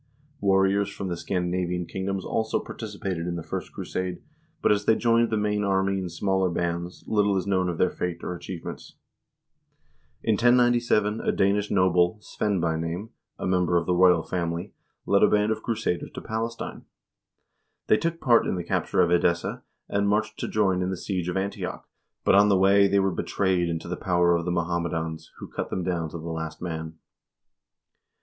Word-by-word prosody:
Warriors 95 0 +3
from 100 -2 -5
the 85 - -2
Scandina 90 +1 -1
vian 90 -1 -2
kingdoms 95 0 -3
also 110 0 0
participated 95 -6 -5
in 85 - -2
the 85 - -5
first - - -5
crusade, 90 -1 -4 0.4
but - - +3
as 105 0 +1
they 110 - +5
joined 115 0 +3
the 110 - 0
main 105 0 0
army 95 0 +1
in 90 -1 -4
smaller 95 +2 0
bands, 85 +1 -3
little 105 -2 +2
is 95 - -1
known 95 -2 +1
of 85 - -3
their 90 - +2
fate 85 -1 -4
or - - -3
achievements. 90 0 -8 1.3
In 110 - +2
1097 120 -2 +3
a - - +1
Danish 100 +1 +1
noble, 90 0 +3
Svein 105 -2 -2
by 80 -1 0
name, 85 +7 -4 0.3
a - - -4
member 90 -1 +2
of 85 - 0
the 90 - +1
royal 90 -2 +5
family, 85 -1 -3 0.3
led - - +3
a - - +6
band 105 +1 +2
of 110 0 -2
crusaders 110 -7 -2
to - - -4
Palestine. 115 +1 -4 1.0
They 110 - +4
took 165 +4 -2
part 120 -2 +4
in - - 0
the 90 - -3
capture - - 0
of 85 - +3
Edessa, 85 -1 +1 0.3
and 100 0 +1
marched 105 +1 0
to - - -2
join 95 -4 +1
in 90 - -1
the 95 - -3
siege 90 -2 -3
of 90 - -2
Antioch, 100 +1 -4 0.4
but - - +5
on 100 +1 +6
the 100 - +4
way 100 +1 +5
they 100 +1 +2
were 95 0 +2
betrayed 90 -2 0
into 85 0 -3
the 90 - -3
power 85 -2 +2
of 85 -1 -2
the 90 - -1
Mohammedans, 85 -2 -2
who - - -8
cut - - -5
them 95 - -2
down 85 -3 -1
to 85 - -7
the 80 - -9
last 80 -1 -4
man. 80 -2 -5
95 Hz, 190 wpm, -26 LUFS, 85-100 Hz, 1.3 s, a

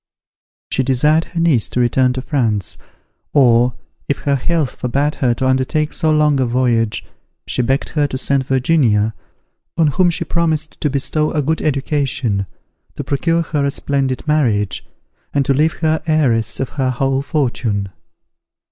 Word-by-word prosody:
She - - +1
desired 150 +5 +2
her 175 - -6
niece 155 -10 +2
to - - -2
return 125 +1 +2
to 130 0 -5
France: 115 - -1 0.5
or, 125 -3 +4 0.3
if 140 - +1
her 140 -1 +2
health 155 +1 -1
forbade 140 +4 0
her 120 -3 +2
to 130 - -2
undertake 130 +4 0
so 160 - +1
long 150 -2 +3
a 130 - +1
voyage, 115 -3 0 0.4
she - - -1
begged 135 +4 0
her 150 -2 +1
to 130 - -4
send 135 0 +1
Virginia, 125 -6 +2 0.6
on 160 -3 +4
whom 175 +5 +2
she 170 - -2
promised 160 -2 -1
to 150 - +1
bestow 145 +3 0
a 150 -2 0
good 160 +4 -1
education, 135 -8 -1 0.5
to - - -4
procure 165 +4 0
for 155 -2 -3
her 140 - +1
a - - +1
splendid 135 -1 -2
marriage, 115 -10 +1 0.5
and 140 -1 +2
to 135 - +2
leave 155 +4 +2
her 160 -1 +1
heiress 120 -9 +2
of 135 - -2
her 135 -3 -1
whole 135 +2 0
fortune. 120 -9 -1
135 Hz, 165 wpm, -18 LUFS, 125-155 Hz, 0.6 s, or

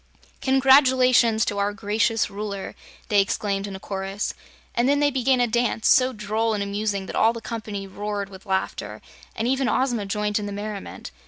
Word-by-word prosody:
"Congratulations 255 -4 +4
to 205 - -2
our 200 +1 0
gracious 215 +1 0
Ruler!" 200 -1 -5 0.4
they 205 -2 +5
exclaimed 200 0 -2
in 195 - -7
a - - -7
chorus, 195 +1 -4 0.4
and 240 +3 +2
then 285 0 +3
they 290 0 +3
began 260 -1 +2
a 245 - +4
dance, 235 -1 0
so 255 0 +5
droll 215 0 -1
and 200 - -1
amusing 200 -1 -2
that - - -7
all 225 +1 +4
the 230 - -6
company 215 -4 -5
roared 205 +1 -4
with 195 +1 -13
laughter 190 0 -2 0.4
and 225 - -1
even 265 0 +1
Ozma 240 -6 0
joined 210 +1 -1
in 205 - -4
the - - -5
merriment. 205 0 -6
215 Hz, 180 wpm, -24 LUFS, 200-245 Hz, 0.4 s, they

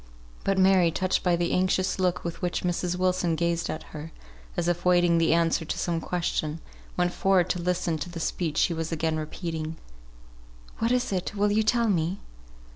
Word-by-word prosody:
But 195 0 +1
Mary, 190 -2 +5
touched 185 +3 0
by 180 -1 +2
the 170 0 -1
anxious 185 +1 +1
look 180 -1 +1
with 170 -1 -5
which 175 -1 -1
Mrs. 180 0 -1
Wilson 180 -2 +1
gazed 170 +1 0
at 155 - -4
her, 155 +1 -7 0.5
as 170 - 0
if 175 0 0
awaiting 175 -2 +4
the 165 - +3
answer 165 0 +2
to 155 - -4
some 170 -2 -1
question, 165 -3 -2 0.4
went 175 0 +1
forward 185 -2 +2
to 180 - -2
listen 170 -2 0
to 165 - -5
the 170 -1 -7
speech 160 -1 -2
she 170 - +3
was 160 0 -3
again 160 -1 0
repeating. 160 0 -4 1.0
"What 230 +1 +1
is 250 -3 +1
this? 185 +1 -2
will 205 0 +2
you 215 +1 +3
tell 235 +1 +2
me?" 175 -2 0
175 Hz, 190 wpm, -27 LUFS, 165-185 Hz, 1.0 s, Mary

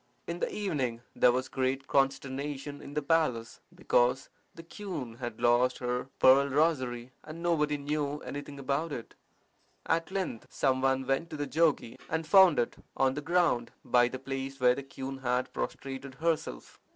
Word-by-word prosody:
In 170 +1 -4
the - - -1
evening 130 - -2
there - - +5
was 130 +1 -1
great 130 +1 -1
consternation 140 +1 -1
in 145 - -10
the 150 - 0
palace, 140 -8 0 0.2
because 125 +2 +2 0.3
the 165 - -10
queen 165 - -6
had 120 -3 -6
lost 120 +2 +3
her 125 +1 -2
pearl 135 +2 +6
rosary, 130 -5 0
and 160 +2 -9
nobody 150 -4 +1
knew 145 0 -2
anything 145 0 -7
about 140 +4 -1
it. 120 -5 -6 0.7
At 165 0 0
length 190 - -3
some 130 -2 +1
one 135 0 +1
went 135 +6 0
to 155 - -6
the 145 - -2
jogi, 155 -7 +1
and 160 0 -1
found 190 -2 +7
it 120 - 0 0.2
on 135 -1 +3
the 145 - -4
ground 165 -7 +1
by 120 -1 +4
the 130 - -5
place 135 +1 -5
where 125 -1 +5
the 140 - -5
queen 135 0 -7
had 125 0 -1
prostrated 135 0 -5
herself. 165 +2 -2
135 Hz, 165 wpm, -30 LUFS, 130-155 Hz, 0.7 s, found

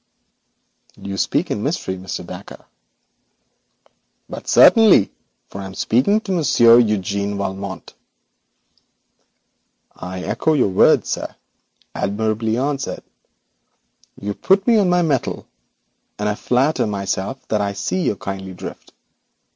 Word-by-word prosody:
'You 100 0 -6
speak - - -1
in - - -2
mystery, 95 - -2
Mr. 95 0 -6
Dacre.' - - -10 1.6
'But - - -9
certainly, 220 - +6 0.4
for 100 - -8
I - - -6
am 95 0 -9
speaking 130 - +2
to 200 - -6
Monsieur 120 -9 +5
Eugène 100 -2 -1
Valmont.' 95 0 -5 2.0
'I 90 0 -6
echo 160 - 0
your 130 -9 +2
words, 95 - +4
sir. - - -4 0.6
Admirably 110 +2 -1
answered. 140 +1 -3 1.2
You 100 0 -4
put 195 - +2
me 230 -2 +4
on 195 -3 +2
my 180 0 +3
mettle, 145 -6 -1 0.7
and 105 - -2
I 105 - +1
flatter 125 +6 +1
myself 100 +4 -4
that 105 -1 +1
I 100 0 -1
see 185 - -2
your 130 - 0
kindly 95 -1 -6
drift. - - -10
105 Hz, 120 wpm, -20 LUFS, 100-145 Hz, 2.0 s, certainly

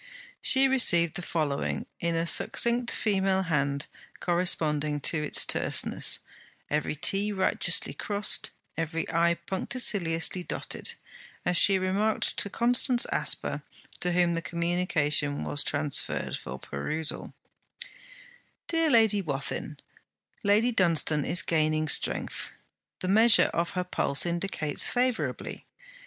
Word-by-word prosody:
She 265 +1 +5
received 175 - +3
the - - -5
following, 155 -5 -3
in 170 0 -1
a 165 +1 -1
succinct 235 +7 +3
female 190 -2 0
hand 140 -4 -1 0.3
corresponding 155 -4 -1
to 155 +2 0
its 150 - +3
terseness; - - +2 0.5
every 150 +1 -1
't' 195 +6 +1
righteously 190 - +2
crossed, 205 -1 0 0.3
every 165 0 -4
'i' 170 +1 +2
punctiliously 185 -4 -2
dotted, - - -3 0.5
as 180 - 0
she 195 +2 +6
remarked 195 +4 0
to 200 - +3
Constance 245 +2 +2
Asper, - - -1 0.4
to 180 - -1
whom 175 -1 +2
the 165 - -3
communication 165 -4 0
was 145 - -2
transferred 145 -1 -2
for 65 +2 -8
perusal: 150 - -5 1.3
'DEAR 330 -1 +1
LADY 220 -5 +4
WATHIN, 140 -6 -5 0.7
Lady 210 +4 +2
Dunstane 165 -6 +1
is 170 -1 +3
gaining 155 -1 0
strength. - - 0 0.5
The 185 - -4
measure 220 +4 +5
of 170 +2 -3
her 180 - 0
pulse 145 -5 0
indicates 170 -4 0
favourably. 250 -1 -3
175 Hz, 115 wpm, -27 LUFS, 155-200 Hz, 1.3 s, she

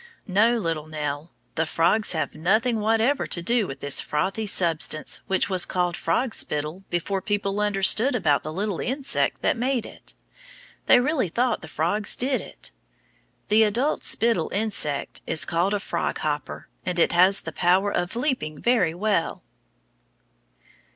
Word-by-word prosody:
No, 220 +5 +3
little 165 -7 -3
Nell, 150 0 -5 0.2
the 160 0 -1
frogs 180 +7 +2
have 160 - -2
nothing 215 +9 +1
whatever 225 +6 +1
to 170 - +2
do 230 +1 +1
with 135 0 -8
this 140 -1 +1
frothy 195 +8 -2
substance 165 -5 +1
which 190 - +2
was 185 -2 0
called 180 -1 -1
frog 225 +10 -1
spittle 150 +5 -3
before 190 +3 -2
people 205 -1 -1
understood 210 +5 +3
about 145 -11 +2
the 155 - -6
little 195 +1 -3
insect 270 +1 -1
that - - +2
made 250 -1 -1
it. - - -10 0.7
They - - +7
really 260 - 0
thought 240 +4 0
the 160 - -9
frogs 175 +8 0
did 260 +1 0
it. - - -8 0.8
The 215 +1 +5
adult 235 +8 +1
spittle 225 -8 +2
insect 200 -9 -1
is 155 - +1
called 175 +4 0
a - - -1
frog - - -3
hopper, 150 -1 -4 0.2
and 180 -1 -3
it 170 - +3
has 185 +3 +4
the - - -6
power 190 +3 +2
of 175 +4 -2
leaping 235 - -1
very 235 -9 +1
well. 200 -2 -1
195 Hz, 155 wpm, -24 LUFS, 165-225 Hz, 0.8 s, They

